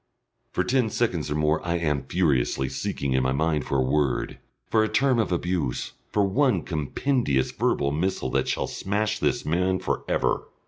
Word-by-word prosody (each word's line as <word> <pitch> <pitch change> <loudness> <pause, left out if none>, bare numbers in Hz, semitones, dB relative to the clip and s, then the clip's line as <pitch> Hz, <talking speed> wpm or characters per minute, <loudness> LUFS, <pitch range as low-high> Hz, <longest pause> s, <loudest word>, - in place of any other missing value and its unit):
For - - 0
ten 125 -3 +1
seconds 95 -11 -1
or 75 - -1
more 75 +1 +1
I 85 0 -1
am 75 -5 -1
furiously 65 -6 +1
seeking 70 +1 -2
in 65 - +3
my 65 0 +1
mind 75 0 0
for 70 - 0
a - - +3
word, 70 +1 0 0.3
for 110 -1 +3
a 110 - 0
term 130 0 +2
of 110 - 0
abuse, 85 -7 -1 0.2
for 105 - +2
one 130 +6 +2
compendious 75 - 0
verbal 70 - 0
missile 90 +6 -1
that - - +1
shall - - 0
smash 105 +2 -2
this 120 - 0
man 90 +4 +1
for - - -2
ever. - - 0
85 Hz, 180 wpm, -25 LUFS, 70-105 Hz, 0.3 s, in